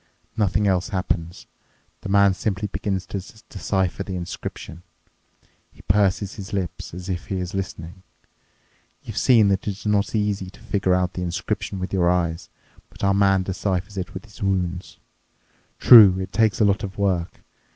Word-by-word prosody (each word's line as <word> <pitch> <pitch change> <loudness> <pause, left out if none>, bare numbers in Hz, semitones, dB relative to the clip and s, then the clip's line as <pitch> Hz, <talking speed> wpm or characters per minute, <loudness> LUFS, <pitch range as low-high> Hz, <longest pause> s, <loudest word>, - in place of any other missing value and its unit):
Nothing 105 -1 +1
else 95 +1 +1
happens. 90 -4 -3 0.6
The - - -6
man 100 -1 +5
simply 100 +2 -2
begins 95 -2 -3
to 100 -2 -5 0.3
decipher 95 -2 -1
the 95 -1 -4
inscription. 85 -1 -7 0.9
He - - -19
purses 100 0 +1
his 100 +1 -9
lips, 95 -3 -4
as 90 0 -8
if 90 -3 -4
he 95 - -3
is 90 0 -5
listening. 95 -1 -6 1.0
You've - - -4
seen 115 -5 +5
that 95 +1 -1
it's 100 +1 -5
not 105 +1 +1
easy 105 -3 -1
to 95 - -17
figure 100 -5 0
out 90 0 0
the 90 - -5
inscription 90 +2 -3
with 95 +1 -5
your 90 -2 +3
eyes, 85 -1 -1 0.4
but - - -12
our 100 0 +3
man 95 -1 +3
deciphers 95 +1 -3
it 95 -2 -5
with 95 - -7
his 105 - -16
wounds. 95 -2 -2 0.8
True, 105 -6 +9
it 95 0 -6
takes 110 0 +2
a 110 - +4
lot 100 +1 +2
of 100 0 -6
work. 95 -4 -1
95 Hz, 165 wpm, -23 LUFS, 90-100 Hz, 1.0 s, True